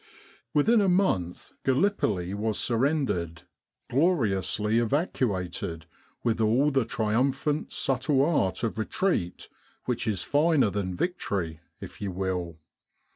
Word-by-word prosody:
Within 215 Hz, +10 st, +4 dB
a 195 Hz, -, +3 dB
month 135 Hz, -, 0 dB
Gallipoli 130 Hz, -, +1 dB
was 105 Hz, +1 st, -1 dB
surrendered 115 Hz, -, 0 dB, 0.4 s
gloriously 115 Hz, -, +1 dB
evacuated 100 Hz, -, -1 dB, 0.4 s
with 115 Hz, -1 st, +1 dB
all 125 Hz, +7 st, +3 dB
the 135 Hz, -3 st, +2 dB
triumphant 130 Hz, +7 st, 0 dB
subtle 135 Hz, +1 st, +1 dB
art 140 Hz, -, 0 dB
of 110 Hz, -1 st, -2 dB
retreat 110 Hz, -, -1 dB, 0.4 s
which 120 Hz, -2 st, -2 dB
is 105 Hz, -4 st, +1 dB
finer 145 Hz, -6 st, +3 dB
than 95 Hz, -3 st, -3 dB
victory, 90 Hz, -, -2 dB, 0.2 s
if -, -, -10 dB
you 100 Hz, -2 st, -2 dB
will. 90 Hz, -3 st, -3 dB
115 Hz, 110 wpm, -27 LUFS, 95-145 Hz, 0.4 s, Within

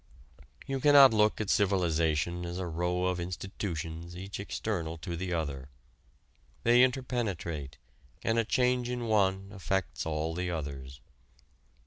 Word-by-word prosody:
You 135 Hz, 0 st, -2 dB
cannot 140 Hz, -3 st, +8 dB
look 105 Hz, 0 st, +3 dB
at 105 Hz, -2 st, 0 dB
civilization 85 Hz, -4 st, +1 dB
as 85 Hz, 0 st, -5 dB
a 95 Hz, -, -3 dB
row 90 Hz, +2 st, -1 dB
of 90 Hz, -1 st, 0 dB
institutions 85 Hz, -1 st, -5 dB
each 95 Hz, +2 st, -6 dB
external 90 Hz, -5 st, -3 dB
to 85 Hz, +2 st, -5 dB
the 90 Hz, +1 st, -4 dB
other. 70 Hz, -5 st, -3 dB, 0.9 s
They 120 Hz, +1 st, +6 dB
interpenetrate 110 Hz, -, -1 dB, 0.5 s
and 115 Hz, 0 st, +2 dB
a -, -, +3 dB
change 125 Hz, +1 st, +1 dB
in 125 Hz, -1 st, -3 dB
one 95 Hz, -3 st, +1 dB
affects 95 Hz, -6 st, -2 dB
all 80 Hz, +1 st, -1 dB
the 90 Hz, +1 st, -2 dB
others. 70 Hz, -5 st, -5 dB
90 Hz, 130 wpm, -30 LUFS, 80-110 Hz, 0.9 s, cannot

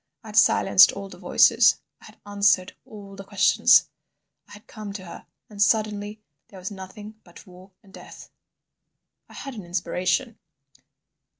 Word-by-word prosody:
I 220 Hz, -, -12 dB
had 210 Hz, -, -10 dB
silenced 195 Hz, -2 st, +5 dB
all 200 Hz, 0 st, -8 dB
the -, -, -14 dB
voices, -, -, +3 dB, 0.2 s
I -, -, -17 dB
had -, -, -17 dB
answered 200 Hz, -2 st, 0 dB
all 200 Hz, -2 st, -13 dB
the 195 Hz, -, -10 dB
questions—I 200 Hz, +1 st, 0 dB
had 210 Hz, +1 st, -15 dB
come 215 Hz, -3 st, -10 dB
to 190 Hz, -2 st, -9 dB
her. 170 Hz, -, -12 dB, 0.2 s
And 205 Hz, -2 st, -9 dB
suddenly 210 Hz, 0 st, -1 dB, 0.2 s
there 195 Hz, -, -15 dB
was 185 Hz, +2 st, -7 dB
nothing 205 Hz, +3 st, -12 dB
but 175 Hz, -, -17 dB
War 185 Hz, +1 st, -17 dB
and 195 Hz, -2 st, -22 dB
Death!" -, -, -14 dB, 1.0 s
I -, -, -16 dB
had 275 Hz, -, -8 dB
an 210 Hz, -4 st, -9 dB
inspiration. 185 Hz, +6 st, -3 dB
200 Hz, 155 wpm, -23 LUFS, 190-210 Hz, 1.0 s, silenced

